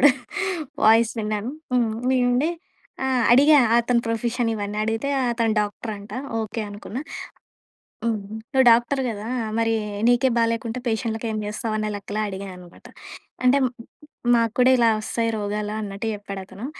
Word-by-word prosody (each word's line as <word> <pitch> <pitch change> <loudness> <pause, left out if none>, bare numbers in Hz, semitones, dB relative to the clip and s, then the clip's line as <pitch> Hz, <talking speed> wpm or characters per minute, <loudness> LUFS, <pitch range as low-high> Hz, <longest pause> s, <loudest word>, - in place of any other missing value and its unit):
అప్పుడు 290 +2 +8 0.8
వాయిస్ 225 +1 +5
విన్నాను. 215 +3 -2 0.6
నేనుండి 250 +4 +2 0.5
ఆహ్, 260 -3 +2
అడిగా 290 +4 +7 0.2
అతని 235 0 +2
ప్రొఫెషన్ 235 +1 -1
ఇవన్నీ, 205 -1 -4
అడిగితే 225 +5 -1 0.2
అతను 230 -2 +1
డాక్టర్ 210 +2 -2
అంట. 200 +1 -11 0.3
ఓకే, 220 +1 -3
అనుకున్నా. 205 +4 -7 1.0
హ్మ్, 230 -2 +1 0.3
"నువ్వు 265 -2 +4
డాక్టర్ 240 +4 +3
కదా? 215 -1 -5 0.3
మరి 225 0 +2 0.3
నీకే 245 +2 +4
బాలేకుంటే 230 +1 0
పేషెంట్లకి 225 0 -1
ఏం 215 - -2
చేస్తావు?" 215 +1 -3
అనే 215 0 -1
లెక్కలో 205 +1 -4
అడిగానన్నమాట. 190 -3 -9 0.6
అంటే 260 +3 +5 0.8
"మాకు 230 -2 +1
కూడా 250 +1 +6
ఇలా 235 -2 +5
వస్తాయి 230 +1 -1
రోగాలు" 210 0 -3
అన్నట్టు 200 +1 -5
చెప్పాడు 200 -1 -7
అతను. 200 +5 -9
225 Hz, 130 wpm, -23 LUFS, 210-240 Hz, 1.0 s, అప్పుడు